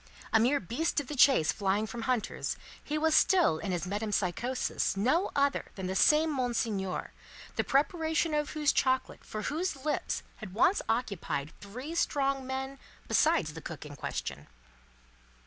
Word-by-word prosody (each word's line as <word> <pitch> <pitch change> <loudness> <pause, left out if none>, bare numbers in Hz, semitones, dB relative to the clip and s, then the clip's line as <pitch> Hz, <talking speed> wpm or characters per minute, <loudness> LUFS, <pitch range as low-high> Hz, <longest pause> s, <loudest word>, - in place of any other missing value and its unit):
A 220 - +6
mere 260 +6 +3
beast 275 - -1
of 290 - -4
the 300 - -4
chase 255 - +5
flying 200 +1 0
from 230 +2 -6
hunters, 245 -2 -1 0.3
he 300 - -2
was 320 +1 +2
still 345 - +4
in 200 - -3
his 175 0 -1
metempsychosis 205 +3 -1
no 260 - +2
other 280 0 +2
than 190 - -5
the 185 +1 -2
same 310 +9 +4
Monseigneur, 230 -7 -1 0.4
the - - +1
preparation 320 +3 +1
of 295 0 0
whose 300 -1 +2
chocolate 260 -1 0
for 215 0 -6
whose 305 - -2
lips 300 - -1
had 200 -4 -9
once 360 - +4
occupied 200 - -2
three 250 +10 -7
strong 275 -5 0
men 265 +1 -4 0.3
besides 305 - +3
the 165 - -8
cook 155 -2 -7
in 145 -1 -9
question. 70 - -5
255 Hz, 155 wpm, -30 LUFS, 200-295 Hz, 0.4 s, A